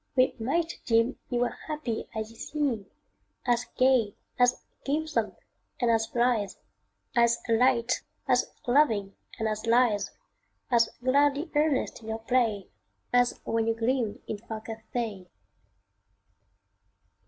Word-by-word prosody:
we 255 Hz, 0 st, +4 dB
might 330 Hz, +9 st, 0 dB
deem 230 Hz, +2 st, +2 dB
Ye 245 Hz, -, 0 dB
were 245 Hz, 0 st, 0 dB
happy 300 Hz, -8 st, -3 dB
as 220 Hz, 0 st, -3 dB
ye -, -, -16 dB
seem 245 Hz, -5 st, -2 dB, 0.6 s
As 240 Hz, -1 st, +2 dB
gay, 255 Hz, -5 st, +3 dB, 0.2 s
as 245 Hz, 0 st, +3 dB, 0.2 s
gamesome, 310 Hz, +3 st, -1 dB, 0.4 s
and 240 Hz, -2 st, +3 dB
as 225 Hz, -1 st, +2 dB
blithe, 235 Hz, -5 st, +1 dB, 0.6 s
As 235 Hz, -1 st, +4 dB
light, 240 Hz, +1 st, +3 dB, 0.3 s
as -, -, +2 dB
loving, 230 Hz, -7 st, +3 dB, 0.2 s
and 220 Hz, -, -1 dB
as 215 Hz, +1 st, -3 dB
lithe, 230 Hz, -4 st, +4 dB, 0.7 s
As 230 Hz, -2 st, +4 dB
gladly 285 Hz, +4 st, +2 dB
earnest 295 Hz, -5 st, +1 dB
in 220 Hz, -, -12 dB
your 220 Hz, -, -1 dB
play, 225 Hz, -4 st, +1 dB, 0.5 s
As 245 Hz, 0 st, +3 dB
when 225 Hz, 0 st, 0 dB
ye 225 Hz, -, +2 dB
gleamed 230 Hz, -1 st, -1 dB
in 210 Hz, -, -4 dB
far 220 Hz, 0 st, -7 dB
Cathay. 220 Hz, -3 st, -5 dB
235 Hz, 125 wpm, -28 LUFS, 225-255 Hz, 0.7 s, we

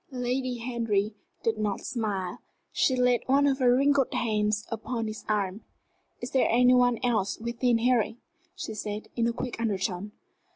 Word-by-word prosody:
Lady 250 Hz, -1 st, -2 dB
Henry 230 Hz, -4 st, -1 dB, 0.3 s
did 220 Hz, -1 st, 0 dB
not 210 Hz, -2 st, -1 dB
smile. 200 Hz, -6 st, -3 dB, 0.3 s
She 260 Hz, -, +2 dB
laid 250 Hz, -1 st, +3 dB
one 275 Hz, +2 st, +4 dB
of 275 Hz, -1 st, +2 dB
her 245 Hz, -1 st, +5 dB
wrinkled 275 Hz, 0 st, +3 dB
hands 210 Hz, -1 st, 0 dB
upon 225 Hz, +1 st, -3 dB
his 215 Hz, 0 st, -6 dB
arm. 205 Hz, -1 st, -1 dB, 0.6 s
"Is 240 Hz, -, -5 dB
there 265 Hz, -, +3 dB
any 250 Hz, +2 st, +5 dB
one 245 Hz, -1 st, +4 dB
else 215 Hz, -5 st, +1 dB
within 235 Hz, +1 st, +1 dB
hearing?" 230 Hz, -2 st, +1 dB, 0.4 s
she 220 Hz, -, -5 dB
said, 210 Hz, 0 st, -5 dB
in 235 Hz, -1 st, +1 dB
a -, -, +1 dB
quick 235 Hz, 0 st, -5 dB
undertone. 200 Hz, -2 st, -2 dB
230 Hz, 160 wpm, -28 LUFS, 215-250 Hz, 0.6 s, her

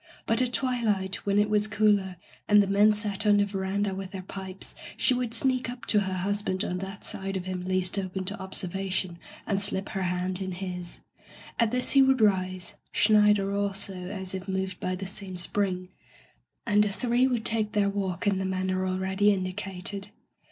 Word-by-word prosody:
But 225 Hz, +3 st, +3 dB
at 250 Hz, -1 st, +1 dB
twilight, 220 Hz, -7 st, -1 dB
when 200 Hz, 0 st, +2 dB
it 205 Hz, 0 st, +4 dB
was 210 Hz, 0 st, +2 dB
cooler, 205 Hz, -3 st, +2 dB, 0.3 s
and 205 Hz, 0 st, +6 dB
the -, -, -1 dB
men 200 Hz, +2 st, +5 dB
sat 210 Hz, 0 st, -1 dB
on 205 Hz, -1 st, +6 dB
the 205 Hz, -, +4 dB
veranda 195 Hz, 0 st, -1 dB
with 190 Hz, 0 st, -5 dB
their 190 Hz, -1 st, -7 dB
pipes, 190 Hz, 0 st, -7 dB, 0.2 s
she 260 Hz, -, +3 dB
would 245 Hz, -2 st, -1 dB
sneak 255 Hz, +1 st, +2 dB
up 245 Hz, 0 st, -8 dB
to 210 Hz, -, +3 dB
her 190 Hz, -2 st, -2 dB
husband 190 Hz, 0 st, 0 dB
on 180 Hz, -, -2 dB
that 195 Hz, +1 st, -7 dB
side 195 Hz, 0 st, -3 dB
of 180 Hz, -, -5 dB
him 185 Hz, -1 st, -4 dB
least 185 Hz, +1 st, +1 dB
open 185 Hz, 0 st, -4 dB
to 200 Hz, +2 st, -1 dB
ob 190 Hz, 0 st, -8 dB
servation 185 Hz, -1 st, -1 dB, 0.3 s
and 200 Hz, -1 st, 0 dB
slip 195 Hz, -1 st, +2 dB
her 195 Hz, -, -3 dB
hand 180 Hz, +1 st, -1 dB
in 190 Hz, -1 st, -3 dB
his. 180 Hz, -1 st, -6 dB, 0.6 s
At 230 Hz, -2 st, +4 dB
this 250 Hz, +2 st, +1 dB
he 275 Hz, -, +6 dB
would 265 Hz, -1 st, +4 dB
rise 185 Hz, -3 st, +1 dB
— -, -, -44 dB
Schneider 210 Hz, -2 st, +4 dB
also, 200 Hz, -1 st, -1 dB
as 190 Hz, -1 st, -5 dB
if 190 Hz, 0 st, -5 dB
moved 190 Hz, 0 st, -2 dB
by 185 Hz, -, -2 dB
the 195 Hz, +1 st, -6 dB
same 190 Hz, -1 st, -5 dB
spring 185 Hz, 0 st, -2 dB, 0.4 s
— -, -, -40 dB
^and 210 Hz, -1 st, +4 dB
the 210 Hz, -, +2 dB
three 245 Hz, +5 st, +2 dB
would 240 Hz, -4 st, -1 dB
take 220 Hz, -1 st, 0 dB
their 205 Hz, -2 st, +3 dB
walk 190 Hz, -3 st, -3 dB
in 200 Hz, -2 st, +2 dB
the -, -, -1 dB
manner 185 Hz, 0 st, -1 dB
already 190 Hz, +2 st, +2 dB
indicated. 195 Hz, +1 st, -3 dB
195 Hz, 200 wpm, -27 LUFS, 185-210 Hz, 0.6 s, and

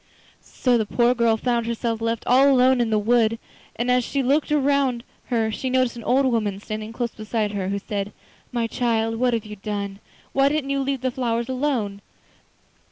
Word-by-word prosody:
So 245 Hz, -2 st, 0 dB
the 220 Hz, -, 0 dB
poor 240 Hz, +2 st, +3 dB
girl 235 Hz, -2 st, +2 dB
found 235 Hz, 0 st, 0 dB
herself 230 Hz, -1 st, -2 dB
left 230 Hz, 0 st, -2 dB
all 265 Hz, +3 st, +5 dB
alone 255 Hz, -1 st, +4 dB
in 235 Hz, -, 0 dB
the 215 Hz, -, +2 dB
wood, 230 Hz, +1 st, +2 dB, 0.4 s
and 245 Hz, +2 st, 0 dB
as 250 Hz, 0 st, +3 dB
she 275 Hz, +3 st, -1 dB
looked 280 Hz, +4 st, +2 dB
round 280 Hz, -4 st, +1 dB, 0.2 s
her 225 Hz, -3 st, 0 dB
she 260 Hz, +4 st, -3 dB
noticed 255 Hz, -2 st, +1 dB
an 235 Hz, -, -8 dB
old 265 Hz, +2 st, +3 dB
woman 215 Hz, -6 st, 0 dB
standing 215 Hz, +1 st, -6 dB
close 235 Hz, 0 st, -3 dB
beside 215 Hz, -1 st, -2 dB
her, 195 Hz, -2 st, -3 dB
who 200 Hz, -, -1 dB
said: 200 Hz, 0 st, -4 dB, 0.4 s
'My 235 Hz, -1 st, 0 dB
child, 225 Hz, -1 st, 0 dB
what 245 Hz, 0 st, +2 dB
have 225 Hz, -, -3 dB
you 210 Hz, 0 st, -8 dB
done? 200 Hz, -1 st, -4 dB, 0.3 s
Why 275 Hz, +1 st, +4 dB
didn't 290 Hz, -2 st, -1 dB
you 275 Hz, -, 0 dB
leave 270 Hz, -1 st, -1 dB
the 255 Hz, -1 st, 0 dB
flowers 235 Hz, -1 st, -1 dB
alone? 250 Hz, -7 st, -1 dB
235 Hz, 195 wpm, -23 LUFS, 220-255 Hz, 0.4 s, all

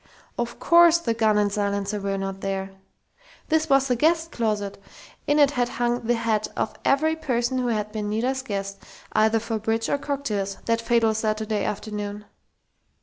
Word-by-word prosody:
Of 240 Hz, 0 st, -4 dB
course 340 Hz, 0 st, +6 dB
the 245 Hz, -9 st, -1 dB
gun 220 Hz, -2 st, +2 dB
and 205 Hz, -1 st, +2 dB
silencer 200 Hz, 0 st, -1 dB
were 195 Hz, 0 st, -2 dB
not 195 Hz, 0 st, -4 dB
there! 195 Hz, 0 st, -3 dB, 0.8 s
This 315 Hz, 0 st, +2 dB
was 275 Hz, 0 st, +4 dB
the 250 Hz, -, +2 dB
guest 325 Hz, +5 st, +2 dB
closet! 210 Hz, -4 st, -2 dB, 0.5 s
In 290 Hz, -, +3 dB
it 290 Hz, -2 st, +5 dB
had 245 Hz, -3 st, 0 dB
hung 240 Hz, 0 st, -1 dB
the 240 Hz, -, +3 dB
hat 225 Hz, -2 st, 0 dB
of -, -, -1 dB
every 315 Hz, +3 st, +2 dB
person 255 Hz, -4 st, -1 dB
who 250 Hz, -, -1 dB
had 215 Hz, -2 st, -1 dB
been 210 Hz, -1 st, -3 dB
Nita's 250 Hz, +5 st, -1 dB
guest, 195 Hz, -5 st, -4 dB, 0.3 s
either 220 Hz, +1 st, +3 dB
for 225 Hz, 0 st, -3 dB
bridge 225 Hz, +1 st, -1 dB
or 285 Hz, -, +1 dB
cocktails, 215 Hz, -10 st, -2 dB
that 230 Hz, 0 st, +1 dB
fatal 230 Hz, -1 st, +2 dB
Saturday 215 Hz, -1 st, -1 dB
afternoon! 210 Hz, 0 st, -4 dB
225 Hz, 170 wpm, -24 LUFS, 210-260 Hz, 0.8 s, course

